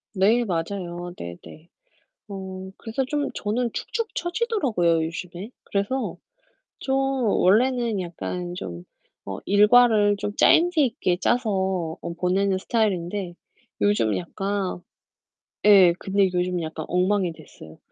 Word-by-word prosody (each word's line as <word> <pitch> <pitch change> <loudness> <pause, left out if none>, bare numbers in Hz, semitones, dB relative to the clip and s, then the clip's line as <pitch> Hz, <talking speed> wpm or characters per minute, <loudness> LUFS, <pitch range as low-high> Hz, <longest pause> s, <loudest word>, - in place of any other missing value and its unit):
네, 220 +6 +3
맞아요. 175 -1 -4
네네. 85 - -10 0.6
어 190 -1 -7
그래서 235 +4 -3
좀 290 +1 -1
저는 230 +3 -1
축축 460 -1 -4
쳐지더라고요, 285 - 0
요즘에. 175 +5 -7
그래서 205 +7 -2 0.6
좀 265 - -1
원래는 240 -3 +2
약간 175 0 -5
좀 85 - -7 0.4
어 95 -1 -5
일과를 210 0 +5
좀 205 +1 -4
짜임새 340 -1 +4
있게 225 -8 +1
짜서 190 -7 0
어 170 - -5
보내는 190 +2 +1
스타일인데 190 -4 -1 0.5
요즘 205 - +2
약간 195 +1 -3 0.9
예, 195 -4 +7
근데 195 -1 +1
요즘 180 0 0
약간 160 -1 -5
엉망이 185 0 +1
됐어요. 145 - -14
195 Hz, 240 characters per minute, -24 LUFS, 175-225 Hz, 0.9 s, 예